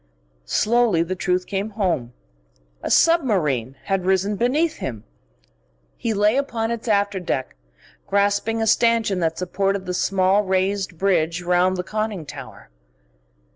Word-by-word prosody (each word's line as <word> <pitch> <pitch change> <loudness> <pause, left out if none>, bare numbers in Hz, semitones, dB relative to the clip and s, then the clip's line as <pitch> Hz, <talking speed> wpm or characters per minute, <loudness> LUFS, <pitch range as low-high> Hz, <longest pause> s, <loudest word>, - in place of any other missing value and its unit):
Slowly 225 -7 +2
the 175 +2 -3
truth 180 0 0
came 200 +2 -3
home: 165 - -1 0.7
a - - -4
submarine 175 - +2
had 195 -2 -1
risen 190 +2 +1
beneath 295 +9 +1
him. 115 -5 -5 0.9
He 230 - -2
lay 210 +4 +3
upon 235 -5 -1
its 235 0 -5
after 200 -2 +1
deck, 135 -7 -3 0.5
grasping 200 +3 +1
a - - +1
stanchion 225 -3 +2
that 165 -1 -1
supported 195 +1 -1
the 180 - -3
small 190 +2 +2
raised 190 -1 -1
bridge 175 -2 +1
round 180 +1 +2
the 180 - -2
conning 215 -4 -3
tower. 140 - -11
195 Hz, 135 wpm, -22 LUFS, 180-220 Hz, 0.9 s, lay